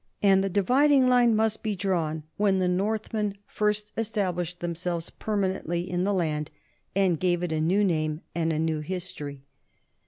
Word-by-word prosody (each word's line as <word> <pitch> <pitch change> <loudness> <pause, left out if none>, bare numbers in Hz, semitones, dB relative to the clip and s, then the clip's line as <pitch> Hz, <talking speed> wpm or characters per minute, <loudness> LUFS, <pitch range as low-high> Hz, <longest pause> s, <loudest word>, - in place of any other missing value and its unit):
And 195 -1 +5
the 195 - 0
dividing 255 +8 +4
line 245 -2 +5
must 220 0 +1
be 215 -2 -1
drawn 170 -5 -1
when 200 -2 +2
the 185 -1 +1
Northmen 210 +2 -1
first 210 0 -1
established 180 -6 -2
themselves 170 0 -3
permanently 190 -4 -2
in 180 0 -1
the 205 - +1
land 155 -5 -1 0.5
and 190 -5 +2
gave 175 -1 +1
it 175 - -2
a 155 -1 0
new 185 +6 +3
name 155 -4 0
and 165 -1 0
a 155 - -1
new 160 0 0
history. 150 -5 -6
185 Hz, 160 wpm, -27 LUFS, 170-210 Hz, 0.5 s, And